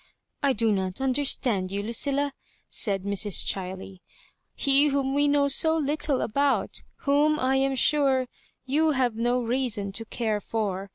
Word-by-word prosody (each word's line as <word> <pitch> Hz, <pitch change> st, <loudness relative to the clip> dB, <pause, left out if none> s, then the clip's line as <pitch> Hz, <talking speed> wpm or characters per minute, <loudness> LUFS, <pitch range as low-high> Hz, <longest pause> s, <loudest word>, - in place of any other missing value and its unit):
"I 280 Hz, -1 st, +2 dB
do 225 Hz, -3 st, +1 dB
not 190 Hz, 0 st, -2 dB
understand 255 Hz, -7 st, 0 dB
you, 200 Hz, +1 st, -3 dB
Lucilla," 280 Hz, +5 st, 0 dB, 0.4 s
said 195 Hz, -3 st, +1 dB
Mrs. 200 Hz, 0 st, +1 dB
Chiley. 190 Hz, 0 st, -4 dB, 0.3 s
" -, -, -49 dB
He 280 Hz, +1 st, +5 dB
whom 275 Hz, -1 st, -1 dB
we 290 Hz, +1 st, +2 dB
know 285 Hz, 0 st, +2 dB
so 320 Hz, +3 st, +3 dB
little 295 Hz, -2 st, -1 dB
about 280 Hz, +5 st, 0 dB
— -, -, -45 dB
whom, 295 Hz, +2 st, +2 dB
I 260 Hz, +1 st, +1 dB
am 270 Hz, 0 st, 0 dB
sure, 270 Hz, -1 st, +2 dB, 0.4 s
you 305 Hz, +4 st, +1 dB
have 250 Hz, -4 st, 0 dB
no 240 Hz, +2 st, 0 dB
reason 230 Hz, -5 st, -1 dB
to 225 Hz, +4 st, -4 dB
care 220 Hz, -2 st, -2 dB
for. 200 Hz, -3 st, -3 dB
255 Hz, 160 wpm, -25 LUFS, 210-280 Hz, 0.4 s, He